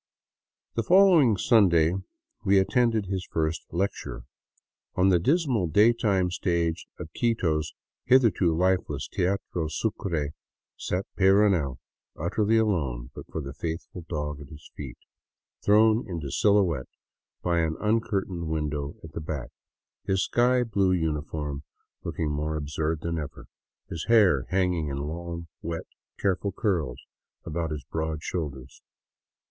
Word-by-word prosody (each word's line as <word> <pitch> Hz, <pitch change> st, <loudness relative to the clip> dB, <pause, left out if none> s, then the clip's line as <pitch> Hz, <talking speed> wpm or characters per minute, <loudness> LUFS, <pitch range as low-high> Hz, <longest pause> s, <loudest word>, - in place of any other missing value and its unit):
The 115 Hz, -, 0 dB
following 170 Hz, -, +6 dB
Sunday 85 Hz, -7 st, +4 dB, 0.5 s
we 95 Hz, 0 st, +5 dB
at 95 Hz, -, +1 dB
tended 115 Hz, -5 st, +2 dB
his 95 Hz, -1 st, -2 dB
first 80 Hz, 0 st, -1 dB
lecture." 95 Hz, +4 st, -3 dB, 0.7 s
On 95 Hz, +1 st, +4 dB
the 90 Hz, -2 st, +4 dB
dismal 130 Hz, -, +2 dB
daytime 105 Hz, -1 st, +3 dB
stage 85 Hz, -2 st, -1 dB
of 80 Hz, -, -8 dB
Quito's 80 Hz, -10 st, 0 dB, 0.3 s
hitherto 110 Hz, -10 st, +4 dB
lifeless 90 Hz, -6 st, +1 dB
Teatro 90 Hz, -3 st, -1 dB
Sucre 80 Hz, -3 st, -2 dB, 0.4 s
sat 95 Hz, +2 st, -2 dB
Peyrounel, 95 Hz, -8 st, +3 dB, 0.4 s
utterly 105 Hz, +7 st, +1 dB
alone 70 Hz, -, 0 dB
but -, -, -9 dB
for 80 Hz, -, -3 dB
the 70 Hz, -1 st, -7 dB
faithful 80 Hz, +3 st, -5 dB
dog 75 Hz, -2 st, -3 dB
at 70 Hz, -, -11 dB
his 75 Hz, 0 st, -13 dB
feet, -, -, -7 dB, 0.7 s
thrown 110 Hz, +3 st, +4 dB
into 80 Hz, -6 st, -4 dB
silhouette 95 Hz, -10 st, +2 dB, 0.5 s
by 85 Hz, -1 st, +2 dB
an 80 Hz, -1 st, 0 dB
uncurtained 100 Hz, -6 st, 0 dB
win 80 Hz, -1 st, -1 dB
dow 70 Hz, -1 st, -4 dB
at 80 Hz, -, -9 dB
the 80 Hz, -, -5 dB
back, 75 Hz, -, -5 dB, 0.5 s
his 95 Hz, 0 st, +1 dB
sky 125 Hz, +1 st, +3 dB
blue 100 Hz, -5 st, +2 dB
uniform 75 Hz, -3 st, -2 dB, 0.4 s
looking 75 Hz, -2 st, -2 dB
more 75 Hz, +1 st, -2 dB
absurd 75 Hz, +1 st, -2 dB
than 85 Hz, -1 st, -2 dB
ever, 75 Hz, -, -7 dB, 0.4 s
his 80 Hz, -2 st, -5 dB
hair 100 Hz, -, +5 dB
hanging 90 Hz, -4 st, +1 dB
in 70 Hz, -1 st, -3 dB
long, 85 Hz, +3 st, -5 dB
wet, 85 Hz, 0 st, -4 dB, 0.3 s
careful 100 Hz, +1 st, 0 dB
curls 80 Hz, -, -1 dB, 0.4 s
about 80 Hz, 0 st, -2 dB
his 75 Hz, -2 st, -5 dB
broad 80 Hz, -1 st, -2 dB
shoulders. 70 Hz, -7 st, -5 dB
85 Hz, 130 wpm, -27 LUFS, 75-100 Hz, 0.7 s, following